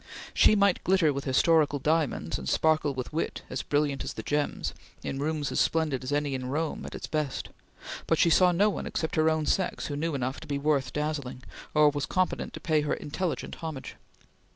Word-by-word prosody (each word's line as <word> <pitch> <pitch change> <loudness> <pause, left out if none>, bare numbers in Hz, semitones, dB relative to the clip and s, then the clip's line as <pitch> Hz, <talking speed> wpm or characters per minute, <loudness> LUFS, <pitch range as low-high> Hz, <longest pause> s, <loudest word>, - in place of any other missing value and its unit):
She - - +6
might 200 -2 +3
glitter 180 -5 +3
with 140 0 -4
historical 145 +2 +3
diamonds 150 - 0
and 65 - -4
sparkle 155 -3 +2
with 130 +3 -5
wit 160 - -2
as - - -2
brilliant 145 -2 0
as - - -5
the - - -6
gems, 150 0 -1 0.3
in 135 - -3
rooms 150 -1 -1
as - - 0
splendid 155 -5 +1
as 130 - -4
any 145 -1 0
in 130 -1 -3
Rome 155 +4 -2
at - - -8
its - - -5
best; 150 -4 -2 0.6
but 165 - +3
she 170 - +4
saw 180 +2 +6
no 200 +5 +3
one - - -4
except 160 - -2
her 155 0 +4
own 160 -1 0
sex 185 +4 0
who 145 - -3
knew 160 +1 -1
enough 130 0 -2
to - - -11
be 140 - -1
worth 140 -3 +1
dazzling, 150 -4 -3 0.3
or 150 -1 +6
was 145 -1 -3
competent 185 0 0
to - - -7
pay 155 -2 +1
her 150 - 0
intelligent 170 +4 -3
homage. 155 -5 -6
150 Hz, 205 wpm, -28 LUFS, 140-160 Hz, 0.6 s, She